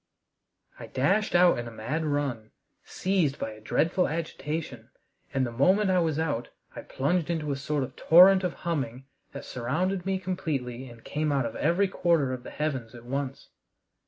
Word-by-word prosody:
I - - -8
dashed 195 +11 +1
out 175 -6 +5
in 120 - -5
a - - -7
mad 125 +9 -3
run, 140 -7 -2 0.3
seized 180 -7 0
by 110 - -4
a 110 0 -12
dreadful 165 - +1
agitation, 150 -5 -4 0.4
and 130 -1 +1
the 120 - -4
moment 190 - +3
I 185 - +3
was 160 -3 0
out 145 -7 -1 0.3
I - - -6
plunged 160 +5 -1
into 155 -3 -1
a - - 0
sort 145 +1 -1
of 130 - -7
torrent 185 +3 +7
of 180 - -1
humming 135 -6 -2 0.3
that 140 - -7
surrounded 175 +10 -2
me 190 0 +1
completely 135 -9 -3
and 115 -1 -14
came 150 0 -1
out 135 -3 +1
of 115 - -5
every 175 +6 +2
quarter 165 -8 +1
of 125 - -5
the - - -9
heavens 130 -6 -3
at 120 0 -12
once. 135 +1 -4
150 Hz, 180 wpm, -27 LUFS, 130-175 Hz, 0.4 s, torrent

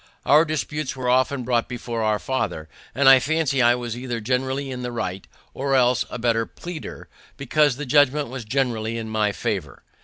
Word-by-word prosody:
Our 150 +3 +6
disputes 155 -2 -3
were 130 -1 -4
often 130 +1 +2
brought 120 -1 0
before 120 -2 -4
our 110 -1 +1
father, 105 -11 -3 0.3
and 135 +1 +3
I 135 -1 +9
fancy 140 0 0
I 120 0 +5
was 120 -2 -5
either 120 -1 -4
generally 130 +4 -2
in 125 -1 -5
the 125 0 -4
right, 95 -5 -4 0.3
or 135 0 -1
else 125 -3 +3
a - - -5
better 115 -1 0
pleader, 175 -3 -8 0.3
because 140 +1 +2
the 150 +3 -5
judgment 145 +1 +3
was 130 -1 -6
generally 115 -2 -1
in 110 -1 -5
my 110 -1 +1
favor. - - -4
125 Hz, 185 wpm, -23 LUFS, 115-140 Hz, 0.3 s, I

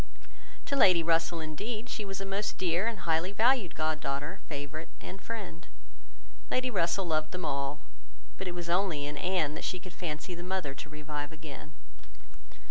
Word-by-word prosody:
To 280 - 0
Lady 185 -10 +7
Russell, 165 0 +3
indeed, 210 +9 -3
she 215 -3 -3
was 195 -1 -3
a 195 - -3
most 195 +2 -1
dear 180 +3 +2
and 225 -5 -2
highly 170 +2 +2
valued 225 -2 +4
god 155 0 +1
daughter, 145 +6 -2
favourite, 150 +2 -4
and 190 +1 -7
friend. 200 -7 -5 0.8
Lady 255 0 +2
Russell 180 -1 +2
loved 155 -2 +1
them 180 -2 -3
all; 140 +1 -1 0.6
but 190 - -3
it 175 - -2
was 175 -1 -3
only 170 -4 +2
in 145 0 -3
Anne 175 -3 +2
that - - -5
she 185 - -1
could 180 0 -10
fancy 165 0 -3
the 175 - -5
mother 180 -6 -1
to 150 - -8
revive 150 -1 -4
again. 155 -1 -9
170 Hz, 175 wpm, -32 LUFS, 155-190 Hz, 0.8 s, Lady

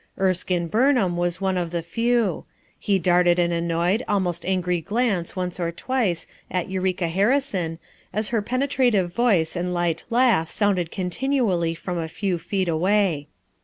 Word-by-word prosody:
Erskine 185 -2 +1
Burnham 225 - +2
was 175 +1 -1
one 190 -1 0
of 175 -1 -2
the 170 0 -3
few; 230 +1 0 0.4
he 200 -2 +1
darted 175 0 +3
an 175 -1 +2
annoyed, 170 +5 0
al 205 - +2
most 175 -2 -2
angry 180 -2 0
glance 205 -3 -1
once 180 0 -3
or 170 -1 -1
twice 185 -2 -1 0.2
at 180 -2 -2
Eureka 185 -2 0
Harrison 195 -3 0 0.3
as 215 +1 -1
her 230 -3 +1
penetrative 245 -6 +1
voice 200 -10 +2
and 180 +1 -2
light 170 -2 0
laugh 230 -9 +3
sounded 195 -6 +1
continually 185 -3 0
from 175 +1 -4
a 165 - -3
few 185 0 -2
feet 190 +1 -2
away. 175 -2 +1
185 Hz, 155 wpm, -23 LUFS, 170-210 Hz, 0.4 s, darted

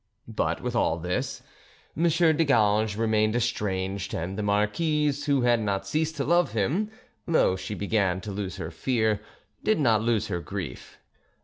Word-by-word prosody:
But - - -1
with - - -2
all - - +2
this, 90 +2 -3 0.5
M. 165 +3 +2
de 165 -1 +3
Ganges 110 -6 +2
remained 110 -1 +2
estranged, 100 -5 -2
and 90 +4 -3
the 105 - -3
marquise, 145 +9 +1
who 140 -2 +2
had 120 -1 +4
not 100 -3 -1
ceased 160 +1 -1
to 140 - -1
love 175 +4 +2
him, 145 - 0 0.4
though 160 - +3
she 95 +3 -5
began 100 -3 0
to 105 - -6
lose 95 -2 -4
her 80 - -5
fear, 110 +2 0 0.4
did 215 -4 +2
not 115 -7 +3
lose 110 -2 +1
her 90 -5 -3
grief. 85 -8 -7
110 Hz, 165 wpm, -26 LUFS, 100-145 Hz, 0.5 s, had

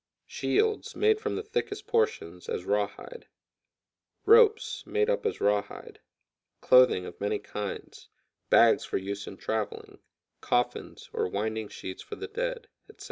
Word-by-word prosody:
Shields, 430 +1 0
made 435 0 +3
from 440 - -2
the 425 - -3
thickest 420 -1 -3
portions, 455 0 -1
as 460 -1 -3
rawhide; 485 -1 -3 1.0
ropes, 450 0 +5
made 435 +2 +1
up 485 -2 0
as - - -3
rawhide; 105 0 -1 0.6
clothing 125 -8 +5
of 85 - -10
many 100 - 0
kinds; 105 -1 -7 0.4
bags - - +5
for - - -2
use 100 +1 -5
in 95 - -8
traveling; 110 -1 -4 0.4
coffins, 120 0 -2
or - - 0
winding 110 +3 -3
sheets 95 -2 -8
for - - -8
the 415 - -6
dead, - - -4 0.2
etc. 430 - -17
425 Hz, 135 wpm, -28 LUFS, -, 1.0 s, ropes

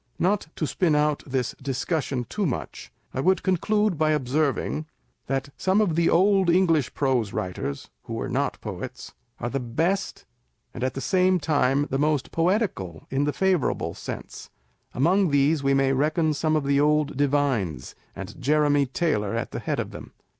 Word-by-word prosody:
Not 195 +2 +1
to 155 - -1
spin 160 0 +1
out 150 0 +1
this 130 -2 -1
discussion 135 0 -2
too 205 -3 -1
much, 125 - -5 0.2
I - - -3
would 185 +5 +2
con 185 -1 +2
clude 210 -2 +1
by 155 -1 +3
observing, 150 +2 -1 0.4
that 135 +1 -2
some 190 +3 +2
of 195 -7 +2
the 170 0 +3
old 190 +1 +4
English 170 -6 +2
prose 130 -7 0
writers 90 -6 -4 0.2
(who - - -5
were - - -3
not - - -1
poets) - - -7 0.3
are 120 - -3
the 135 - -1
best, 165 +11 -1 0.5
and, 120 - -5
at 130 - -1
the 135 - -3
same 185 +4 +3
time, 145 -3 +2
the 135 - 0
most 150 -2 0
poetical 165 - -1
in 135 +2 +1
the 150 - +1
favourable 190 -6 0
sense. - - -8 0.5
Among 180 +8 +3
these 145 +2 +3
we 135 0 +2
may 135 0 +3
reckon 155 +3 +1
some 155 +2 0
of 155 - +1
the 140 0 +2
old 150 -1 +2
divines, 130 - 0 0.2
and - - -8
Jeremy 145 0 +3
Taylor 115 -8 -1
at 115 - -3
the - - -4
head - - -2
of - - -3
them. - - -10
150 Hz, 175 wpm, -25 LUFS, 135-170 Hz, 0.5 s, old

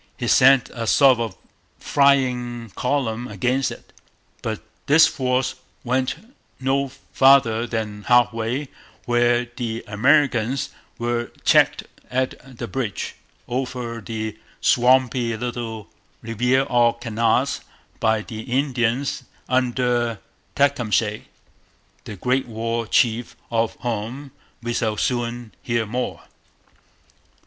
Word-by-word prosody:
He 120 - -3
sent 130 +2 +5
a 115 -2 -4
sort 135 -2 +5
of 115 -1 -3 0.4
flying 125 -5 +1
column 125 -1 -1
against 130 +2 0
it. - - -11 0.5
But - - -4 0.2
this 155 +3 +7
force 130 -1 0 0.3
went 130 +1 0 0.4
no 135 +1 +1 0.3
farther 120 -4 +5
than 105 -3 -4
half 120 -1 +4
way, 120 +5 -2 0.4
where 120 0 +2
the 115 -2 -3
Americans 130 +2 +2 0.3
were 120 0 -2
checked - - +4 0.3
at 130 0 -3
the 120 - -4
bridge 115 -6 -3 0.3
over 125 -2 -3
the 110 +1 -5 0.2
swampy 125 -2 +3
little 115 -3 -5 0.4
Riviere 125 +4 +1
aux 120 -1 +4
Canards 115 +3 0 0.4
by 110 -1 +2
the 110 0 -8
Indians 130 0 0 0.3
under 125 -2 +1 0.4
Tecumseh, 115 -7 +1 0.8
the 105 - -7
great 125 +7 0
War 115 0 -3
Chief 115 +1 +1 0.2
of 115 -1 0
whom 120 +4 -4 0.3
we 120 0 -2
shall 110 -2 -1
soon 120 -1 -2
hear 115 -2 0
more. 125 +4 -4
120 Hz, 105 wpm, -22 LUFS, 115-130 Hz, 0.8 s, this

